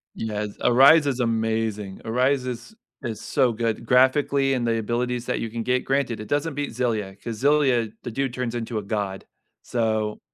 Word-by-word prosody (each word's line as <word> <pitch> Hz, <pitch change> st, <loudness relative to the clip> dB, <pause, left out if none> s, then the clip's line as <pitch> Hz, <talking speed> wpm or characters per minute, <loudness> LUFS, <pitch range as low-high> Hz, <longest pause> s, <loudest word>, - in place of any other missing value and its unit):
Yes, 105 Hz, -1 st, -3 dB
Arise 140 Hz, +5 st, +6 dB
is 130 Hz, -2 st, -1 dB
amazing. 110 Hz, -3 st, -1 dB
Arise 130 Hz, +3 st, +1 dB
is 125 Hz, -, -6 dB, 0.3 s
is 115 Hz, -3 st, -4 dB
so 125 Hz, -2 st, +2 dB
good 115 Hz, -1 st, -2 dB
graphically 135 Hz, +1 st, +3 dB
and 120 Hz, -2 st, 0 dB
the 115 Hz, -1 st, +1 dB
abilities 120 Hz, +2 st, -2 dB
that -, -, -1 dB
you 115 Hz, -, -3 dB
can 115 Hz, 0 st, -3 dB
get, 125 Hz, +2 st, 0 dB
granted, 135 Hz, -4 st, 0 dB
it 110 Hz, -, -7 dB
doesn't 145 Hz, 0 st, -1 dB
beat 145 Hz, -3 st, -3 dB
Xillia 110 Hz, -5 st, -2 dB
'cause 115 Hz, -2 st, -5 dB
Xillia, 135 Hz, -6 st, +3 dB
the -, -, -5 dB
dude 135 Hz, +1 st, -2 dB
turns 125 Hz, -2 st, -3 dB
into 115 Hz, -1 st, -3 dB
a -, -, -5 dB
god, 100 Hz, -2 st, -3 dB, 0.4 s
so 110 Hz, -3 st, -1 dB
120 Hz, 180 wpm, -24 LUFS, 110-130 Hz, 0.4 s, Arise